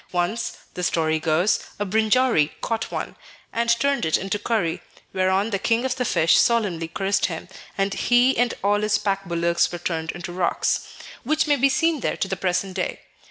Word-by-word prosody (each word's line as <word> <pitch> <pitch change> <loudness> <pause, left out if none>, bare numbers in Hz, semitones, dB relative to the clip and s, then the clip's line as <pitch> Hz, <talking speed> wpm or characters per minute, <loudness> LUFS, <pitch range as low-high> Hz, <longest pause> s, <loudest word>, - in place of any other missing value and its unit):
Once, 180 +6 -1 0.2
the 180 - -5
story 160 -2 +1
goes, 165 +6 +2 0.2
a 205 - -2
Brinjari 220 - +2
caught 225 -1 -2
one, - - -4 0.4
and 235 0 0
turned 270 +3 +2
it 160 - +2
into 195 +2 -3
curry, 180 -8 -1 0.3
whereon 190 +3 +1
the 195 - 0
king 230 +4 +1
of 255 -1 0
the 250 - -2
fish 165 -6 +3
solemnly 200 -9 +1
cursed 195 +3 0
him, 165 -1 -6 0.3
and 195 0 0
he 245 +4 +3
and 245 0 +1
all 205 +1 +2
his 210 0 +2
pack 195 -1 -2
bullocks 170 -1 +1
were 175 - -4
turned 165 -1 -3
into 175 0 -7
rocks, 180 -1 0 0.4
which 310 +1 +1
may 295 -2 +3
be 275 0 +3
seen 325 +3 +1
there - - -2
to - - -1
the 190 - -2
present 185 +1 -1
day. 180 -1 -3
195 Hz, 190 wpm, -23 LUFS, 175-235 Hz, 0.4 s, fish